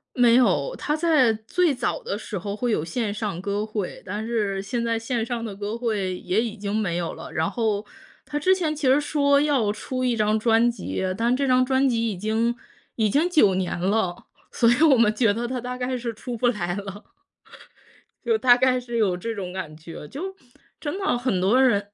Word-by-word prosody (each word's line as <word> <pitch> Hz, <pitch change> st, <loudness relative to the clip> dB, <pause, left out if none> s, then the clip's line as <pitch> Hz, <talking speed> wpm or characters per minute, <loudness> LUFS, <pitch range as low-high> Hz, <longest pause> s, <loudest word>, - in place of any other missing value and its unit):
没 240 Hz, -2 st, +5 dB
有。 190 Hz, -, +2 dB
他 300 Hz, -, -1 dB
在 310 Hz, -7 st, +3 dB
最 285 Hz, +10 st, 0 dB
早 245 Hz, -2 st, -2 dB
的 200 Hz, -, -3 dB
时 210 Hz, -1 st, -6 dB
候 200 Hz, +3 st, -4 dB
会 240 Hz, +2 st, -1 dB
有 180 Hz, -, 0 dB
线 205 Hz, +5 st, -2 dB
上 205 Hz, -5 st, -4 dB
歌 205 Hz, +2 st, -2 dB
会， 210 Hz, -3 st, -5 dB
但 205 Hz, +4 st, -4 dB
是 210 Hz, -4 st, -1 dB
现 235 Hz, +4 st, -3 dB
在 230 Hz, -1 st, 0 dB
线 225 Hz, 0 st, -2 dB
上 235 Hz, -1 st, -3 dB
的 215 Hz, -4 st, -5 dB
歌 205 Hz, +3 st, -4 dB
会 205 Hz, -6 st, -2 dB
也 185 Hz, +5 st, 0 dB
已 230 Hz, -2 st, -4 dB
经 200 Hz, 0 st, -3 dB
没 195 Hz, -6 st, 0 dB
有 170 Hz, -1 st, -3 dB
了。 -, -, -9 dB
然 160 Hz, +1 st, 0 dB
后， 215 Hz, -3 st, -1 dB, 0.4 s
他 295 Hz, -, -4 dB
之 370 Hz, +6 st, +3 dB
前 330 Hz, -5 st, -1 dB
其 295 Hz, -2 st, -1 dB
实 265 Hz, +3 st, +5 dB
说 285 Hz, -1 st, +2 dB
要 280 Hz, -8 st, +2 dB
出 255 Hz, +5 st, -4 dB
一 250 Hz, -2 st, +1 dB
张 215 Hz, 0 st, +2 dB
专 225 Hz, +2 st, +3 dB
辑， 235 Hz, -, -4 dB, 0.2 s
但 235 Hz, +2 st, +2 dB
这 275 Hz, +1 st, 0 dB
张 255 Hz, 0 st, +4 dB
专 265 Hz, +1 st, +2 dB
辑 230 Hz, -2 st, +1 dB
已 195 Hz, -, -6 dB
经 220 Hz, +4 st, 0 dB, 0.4 s
已 220 Hz, -2 st, +1 dB
经 305 Hz, -, +2 dB
9 215 Hz, -, +4 dB
年 185 Hz, -2 st, -2 dB
了， 185 Hz, -1 st, -1 dB, 0.3 s
所 230 Hz, -, +3 dB
以 240 Hz, +5 st, +2 dB
我 290 Hz, -5 st, +6 dB
们 220 Hz, -2 st, +4 dB
觉 220 Hz, -3 st, +3 dB
得 235 Hz, +3 st, -3 dB
它 250 Hz, 0 st, -3 dB
大 250 Hz, +1 st, -5 dB
概 255 Hz, 0 st, -2 dB
是 235 Hz, -1 st, -4 dB
出 240 Hz, +3 st, -6 dB
不 245 Hz, +2 st, +1 dB
来 175 Hz, -7 st, -1 dB
了。 200 Hz, +1 st, -8 dB, 1.1 s
就 455 Hz, -2 st, +2 dB
大 250 Hz, -, +6 dB
概 255 Hz, 0 st, +2 dB
是 240 Hz, -1 st, -5 dB
有 195 Hz, -5 st, +2 dB
这 225 Hz, +6 st, -4 dB
种 185 Hz, -3 st, -5 dB
感 175 Hz, -5 st, -6 dB
觉。 160 Hz, -1 st, -10 dB
就 380 Hz, -, -6 dB, 0.4 s
真 305 Hz, +5 st, -4 dB
的 385 Hz, -10 st, +1 dB
很 240 Hz, -7 st, -1 dB
多 225 Hz, +8 st, +4 dB
人 205 Hz, -6 st, +2 dB
230 Hz, 230 characters per minute, -24 LUFS, 205-255 Hz, 1.1 s, 我